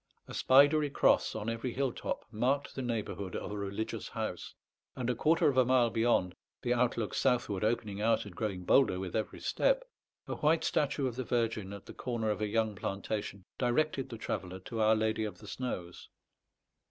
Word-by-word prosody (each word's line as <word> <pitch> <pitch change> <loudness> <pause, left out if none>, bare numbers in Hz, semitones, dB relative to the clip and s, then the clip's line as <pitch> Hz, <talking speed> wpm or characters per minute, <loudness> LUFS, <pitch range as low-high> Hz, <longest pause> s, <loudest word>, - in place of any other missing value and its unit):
A - - -9
spidery 145 +3 +5
cross - - +3
on 110 0 -4
every 115 +2 -2
hill 135 -1 0
top - - -4
marked 130 +6 0
the 135 - -4
neighbourhood 110 -5 -3
of - - -4
a - - -4
religious 100 +2 -4
house; - - -5 0.4
and 125 -1 -1
a - - -2
quarter 160 +2 +3
of 140 -3 +2
a 130 - +7
mile 125 -2 +3
beyond, 115 -6 +2 0.3
the 120 - +2
outlook 120 -3 0
southward 105 -5 +1
opening 105 -2 -1
out 115 0 +2
and 100 -4 -10
growing 100 -4 -3
bolder 95 -2 +4
with 95 -2 -5
every 110 - -2
step, - - +2 0.4
a - - -3
white 155 +2 +3
statue 145 -1 +1
of 125 -2 -2
the 130 - -1
Virgin 115 -5 -1
at 100 0 -9
the - - -10
corner 115 -3 -2
of 105 - -3
a 105 - +1
young 110 0 +1
plantation 100 0 -4
directed 135 +2 +1
the 115 - -6
traveller 95 -4 -4
to 115 +4 -4
Our 110 +1 +5
Lady 110 0 0
of 105 -4 -4
the 105 - -13
Snows. 90 -8 -5
115 Hz, 190 wpm, -32 LUFS, 105-125 Hz, 0.4 s, a